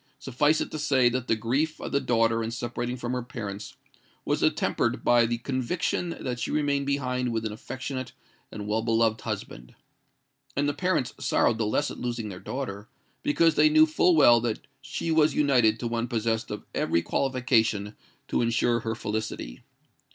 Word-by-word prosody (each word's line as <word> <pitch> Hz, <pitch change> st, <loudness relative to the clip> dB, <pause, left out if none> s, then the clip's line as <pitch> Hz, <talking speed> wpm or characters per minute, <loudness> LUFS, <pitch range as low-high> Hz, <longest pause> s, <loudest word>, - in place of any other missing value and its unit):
Suffice 150 Hz, +5 st, +1 dB
it -, -, -4 dB
to 155 Hz, -, -4 dB
say 130 Hz, -4 st, +3 dB
that 125 Hz, 0 st, -3 dB
the -, -, +3 dB
grief 130 Hz, +8 st, -1 dB
of -, -, -6 dB
the 140 Hz, -, +2 dB
daughter 115 Hz, -2 st, +2 dB
in 110 Hz, -, -2 dB
separating 120 Hz, +1 st, -4 dB
from 120 Hz, 0 st, -4 dB
her 125 Hz, -, -1 dB
parents 105 Hz, -4 st, -7 dB, 0.5 s
was -, -, 0 dB
attempered -, -, +1 dB
by 120 Hz, -1 st, +4 dB
the 120 Hz, +1 st, -1 dB
conviction 145 Hz, +7 st, -2 dB
that 125 Hz, -2 st, -3 dB
she -, -, -2 dB
remained 145 Hz, -2 st, 0 dB
behind 125 Hz, -3 st, -1 dB
with 115 Hz, -1 st, -2 dB
an 110 Hz, -, -2 dB
affectionate 130 Hz, +3 st, -6 dB, 0.4 s
and 105 Hz, -, -6 dB
well 110 Hz, +2 st, 0 dB
beloved 115 Hz, -1 st, +1 dB
husband; -, -, -6 dB, 0.8 s
and 145 Hz, +1 st, +1 dB
the 145 Hz, -, 0 dB
parents 180 Hz, -8 st, 0 dB
sorrowed 115 Hz, -, +2 dB
the 110 Hz, -, +1 dB
less 145 Hz, +7 st, 0 dB
at -, -, -9 dB
losing 120 Hz, -3 st, -3 dB
their 90 Hz, -2 st, -8 dB
daughter, 110 Hz, -6 st, -5 dB, 0.3 s
because 165 Hz, +2 st, +3 dB
they 155 Hz, +1 st, +5 dB
knew 155 Hz, +1 st, +6 dB
full 165 Hz, +3 st, +3 dB
well 120 Hz, -6 st, +6 dB
that 115 Hz, -2 st, -3 dB, 0.2 s
she 135 Hz, +4 st, -3 dB
was 155 Hz, -1 st, +3 dB
united 125 Hz, -7 st, +3 dB
to 120 Hz, -, -2 dB
one 115 Hz, 0 st, -1 dB
possessed 115 Hz, -2 st, -1 dB
of -, -, -6 dB
every 85 Hz, -, +1 dB
qualification 115 Hz, -6 st, +1 dB, 0.3 s
to -, -, 0 dB
ensure 115 Hz, 0 st, +2 dB
her 115 Hz, 0 st, -3 dB
felicity. 110 Hz, -, -4 dB
120 Hz, 180 wpm, -27 LUFS, 115-140 Hz, 0.8 s, knew